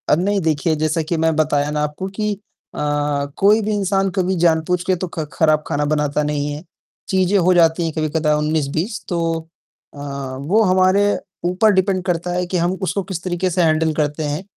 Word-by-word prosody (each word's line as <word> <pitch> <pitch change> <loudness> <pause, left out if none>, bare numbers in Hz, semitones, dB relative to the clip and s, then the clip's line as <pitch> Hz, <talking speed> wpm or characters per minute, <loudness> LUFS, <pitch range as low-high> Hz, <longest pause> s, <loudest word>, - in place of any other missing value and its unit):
अब 150 - +4
नहीं 200 +2 +1
देखिए, 160 0 +1
जैसा 155 +1 0
कि 160 +2 -2
मैं 160 0 +1
बताया 150 -1 +1
ना 150 0 -1
आपको 150 +5 -4
कि 210 -1 0 0.4
अ, - - -5 0.6
कोई 210 +3 +4
भी 215 0 -2
इंसान 195 -1 +1
कभी 185 0 +1
जानबूझके 175 +2 +2
तो 180 +1 -4
ख़ 160 - -2
ख़राब 155 -1 +2
ख़ाना 145 +1 -1
बनाता 150 0 0
नहीं 150 -1 -1
है। 150 +2 -7 0.5
चीज़ें 190 +1 +2
हो 185 0 +4
जाती 170 -1 +3
हैं 165 - -1
कभी-कदा 155 -1 0
19-20 155 +7 -1
तो 175 - -1 0.7
अ, - - -14 0.4
वो 180 +11 +2
हमारे 185 +1 +3 0.4
ऊपर 185 +5 +3
डिपेंड 190 -1 +1
करता 175 -1 -1
है 180 0 -1
कि 180 - -1
हम 175 +1 +1
उसको 195 +1 -1
किस 185 -3 -6
तरीक़े 185 0 -1
से 180 +1 0
हैंडल 160 -1 +2
करते 150 0 -1
हैं, 150 +4 -3
170 Hz, 190 wpm, -19 LUFS, 155-185 Hz, 0.7 s, अब